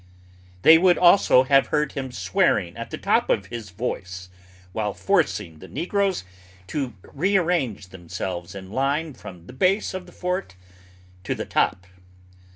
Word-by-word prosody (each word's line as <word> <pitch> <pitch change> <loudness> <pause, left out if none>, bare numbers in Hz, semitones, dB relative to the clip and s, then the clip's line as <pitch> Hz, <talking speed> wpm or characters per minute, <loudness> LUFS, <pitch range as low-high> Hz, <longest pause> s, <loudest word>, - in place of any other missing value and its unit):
They 160 0 +8
would 180 0 +4
also 175 -7 +6
have 135 +1 +4
heard 150 -1 0
him 130 -2 -5
swearing 105 - +1
at 115 0 -7
the - - -5
top - - +1
of 100 - +1
his 110 0 -7
voice, 95 -3 -5 0.4
while 105 -2 -2
forcing 105 - 0
the - - -11
negroes 195 - -1 0.5
to 135 -6 -3
rearrange 170 - 0
themselves 90 0 -6
in 95 -1 -9
line 140 +5 -1
from 90 -8 -12
the 125 - -12
base 190 +11 +1
of 185 -1 -6
the - - -14
fort 180 - -3 0.7
to - - -2
the - - -4
top. 90 - 0
130 Hz, 150 wpm, -24 LUFS, -, 0.7 s, They